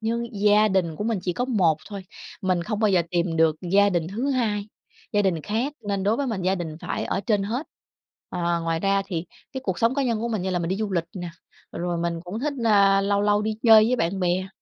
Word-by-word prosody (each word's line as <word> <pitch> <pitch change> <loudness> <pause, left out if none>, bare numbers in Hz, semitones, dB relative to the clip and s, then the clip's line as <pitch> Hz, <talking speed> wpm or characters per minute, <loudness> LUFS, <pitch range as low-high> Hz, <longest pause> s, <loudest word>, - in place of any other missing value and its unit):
nhưng 230 -1 -3
gia 210 +1 +5
đình 180 -5 0
của 210 - -4
mình 225 -2 0
chỉ 180 -1 -1
có 245 +8 -1
1 185 - +2
thôi, 200 -3 -7 0.4
mình 185 -2 +1
không 210 +3 -3
bao 215 - +3
giờ 180 -3 +3
tìm 170 -1 0
được 160 -1 +3 0.2
gia 200 +1 +6
đình 170 -3 0
thứ 240 +9 -2
hai, 215 -5 -1 0.4
gia 205 - +3
đình 175 -5 0
khác 230 - -1 0.2
nên 200 -1 -1
đối 210 +4 +2
với 280 - -1
mình 220 -7 -3
gia 185 +1 +2
đình 165 -4 -5
phải - - -3
ở 195 - -1
trên 205 0 +1
hết. 235 +9 -3 0.6
Ờ, 170 -1 -1
ngoài 165 0 -1
ra 195 +1 +2
thì 170 -3 -3 0.3
cái 265 - -4
cuộc 185 -3 -2
sống 230 +3 +2
cá 280 - +1
nhân 230 -4 0
của 235 - -2
mình 215 -5 -2
như 190 - -2
là 180 - 0
mình 170 -1 -2
đi 190 - -1
du 210 -2 -3
lịch 170 -2 0
nè, 175 -1 -5 0.4
rồi 175 0 -2
mình 170 0 -2
cũng 200 +6 -5
thích, 290 +2 -1
ơ, 200 -3 +5
lâu 200 0 +1
lâu 205 0 +2
đi 215 0 -2
chơi 220 -3 +8
với 250 +2 +1
bạn 190 0 -1
bè, 180 +1 0
200 Hz, 255 wpm, -24 LUFS, 175-220 Hz, 0.6 s, chơi